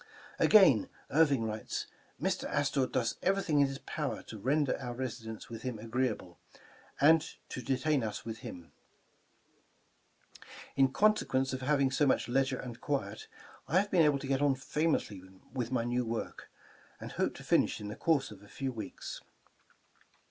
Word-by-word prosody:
Again, 185 - +6 0.2
Irving 145 -5 +4
writes: 110 -1 -3 0.3
"Mr. - - -1
Astor 140 -2 +1
does 120 -3 -1
everything 190 -6 +2
in 140 - +5
his 135 0 -5
power 150 0 -4
to 110 - -9
render 140 +5 +1
our 125 -2 -5
residence 120 -3 -5
with 115 -1 -8
him 125 -3 -4
^ - - -13
agreeable, 115 -6 -2 0.6
and 160 +3 +6 0.3
to 125 - -5
detain 135 +2 +1
us 105 -1 -4
with 115 -1 -5
him 85 -2 -9 2.0
In 135 -1 +4
consequence 135 -9 +2
of 130 - -3
having 140 -1 +2
so 145 +2 +2
much - - +2
leisure 130 +1 +1
and 120 -2 -8
quiet, 110 -8 -3 0.4
I 160 +7 +2
have 200 +2 +2
been 180 - +5
able 150 -3 +4
to 135 - -6
get 135 0 +1
on 145 -2 +3
famously 135 - -1 0.3
with 125 -3 -2
my 125 -3 +1
new 120 +1 0
work, 115 -1 -5 0.5
and - - -7
hope - - -1
to - - -10
finish - - +2
in 105 - -6
the 105 - -5
course 150 -7 +1
of 100 -2 -12
a 100 - -15
few 135 +5 -4
weeks." 115 -3 -7
130 Hz, 165 wpm, -32 LUFS, 115-145 Hz, 2.0 s, Again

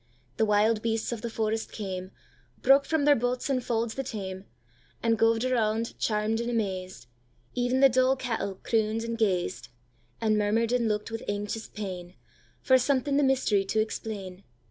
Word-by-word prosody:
The 220 - +3
wild 210 +1 +3
beasts 225 0 -1
of 235 -2 -4
the 235 - -3
forest 220 0 -2
came, 185 -3 -5 0.5
Broke 275 +2 +6
from 315 -3 +1
their 290 -1 +6
bughts 245 +3 -1
and 255 -2 +1
faulds 230 -2 -1
the 270 - -3
tame, 195 -6 -6 0.6
And 230 -1 +3
goved 225 +1 +2
around, 230 -2 0
charm'd 215 +1 0
and 235 - -2
amazed; 185 - -3 0.5
Even 250 +1 +1
the 275 - +9
dull 255 +1 +3
cattle 230 -6 -3
croon'd 220 0 +1
and 230 0 -3
gazed, 190 - 0 0.5
And 215 -1 +2
murmur'd 220 +3 +1
and 245 -2 +2
look'd 210 +1 -2
with 225 - -4
anxious 205 +2 -3
painFor 190 +6 -2
something 275 +2 +1
the - - +4
mystery 260 -7 +2
to 215 - 0
explain. 200 -4 -4
225 Hz, 165 wpm, -28 LUFS, 210-245 Hz, 0.6 s, the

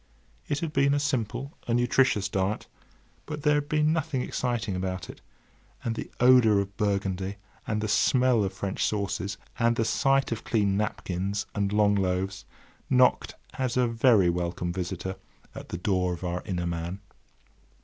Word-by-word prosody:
It 145 +2 -1
had 160 -2 -3
been 140 +1 +3
a - - +1
simple, 140 0 -2
a 120 - +1
nutritious 120 -4 +2
diet; 95 +2 -1 0.6
but 150 -1 -5
there 150 -1 +4
had 145 0 0
been 155 0 +2
nothing 155 -5 -1
exciting 120 -6 -2
about 95 0 -3
it, - - -18 0.6
and 115 - -1
the - - -6
odour 125 -4 +6
of 100 0 -2
Burgundy, 100 -1 -1 0.3
and 105 -1 -1
the 110 - -1
smell 125 +1 +3
of 95 - -1
French 100 -1 -3
sauces, 100 -1 -1 0.2
and 115 0 +3
the 115 - +1
sight 135 +4 +2
of 115 - -3
clean 100 -4 +1
napkins 100 -1 -2
and 100 -1 -1
long 105 -1 +3
loaves, 95 -1 -1 0.4
knocked 130 -1 +3 0.2
as 130 -1 0
a 125 - +4
very 115 -4 +4
welcome 85 0 -1
visitor 95 +1 -4 0.4
at - - -9
the - - -4
door 90 -1 0
of 85 - -12
our 90 0 -2
inner 90 -2 -2
man. 85 +2 -3
105 Hz, 165 wpm, -27 LUFS, 95-125 Hz, 0.6 s, odour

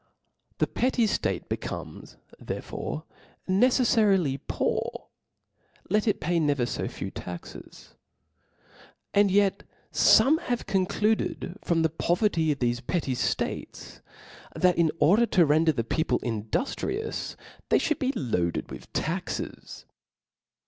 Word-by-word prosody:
The - - +2
petty 250 -2 +1
ftate 210 - -1
becomes - - -6 0.2
therefore - - -5 0.4
necefiarily 200 - +3
poor, - - -2 0.8
let 210 +2 +2
it 210 - +2
pay 170 +2 0
never 145 -5 +1
fo - - -3
few - - -6
taxes. 90 -1 -9 1.2
Ahd 200 0 +5
yet 200 0 +2 0.3
fome 310 +4 +6
have 245 -8 -2
concluded 195 0 0
from 165 -1 +1
the 160 - +3
po* 165 +2 0
verty 170 -7 +1
of 145 - -1
thofe 120 -1 -1
petty 160 -7 0
ftates, 100 -6 -3 0.5
that 180 -1 +3
in 170 -2 +3
order 215 +9 +5
to 175 -6 +4
render 160 +2 +4
the 125 -6 -2
people 160 +7 0
induftrious, 255 - -3 0.3
they - - +5
ftiotild 310 - 0
be 265 0 +1
loac^ed 110 - -1
with - - -10
taxes. - - -4
175 Hz, 120 wpm, -27 LUFS, 140-215 Hz, 1.2 s, fome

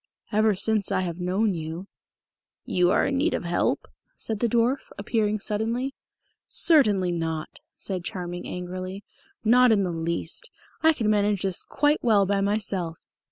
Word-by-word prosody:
"Ever 215 -1 +3
since 215 +1 +1
I - - +2
have 175 -1 -4
known 190 +4 +1
you 165 +2 -5 0.4
" - - -68 0.3
"You 180 -1 +2
are - - +3
in 275 - 0
need 300 +5 +1
of - - -3
help?" 175 0 0 0.3
said 220 -2 -3
the 235 - +2
dwarf, 240 +4 +2 0.2
appearing 215 0 0
suddenly. 230 +6 -1 0.5
"Certainly 210 - +4
not," 160 -2 -3 0.2
said 185 -3 -3
Charming 180 -3 -5
angrily. 185 +2 -5 0.4
"Not 245 +2 +6
in 205 -3 +3
the 180 - -1
least. 165 0 -3 0.3
I 320 0 +5
can 230 -8 -2
manage 205 -2 +2
this 190 -2 -1
quite 295 +2 +1
well 210 -4 +4
by 200 +1 +1
myself." 195 -5 -1
200 Hz, 160 wpm, -25 LUFS, 180-225 Hz, 0.5 s, Not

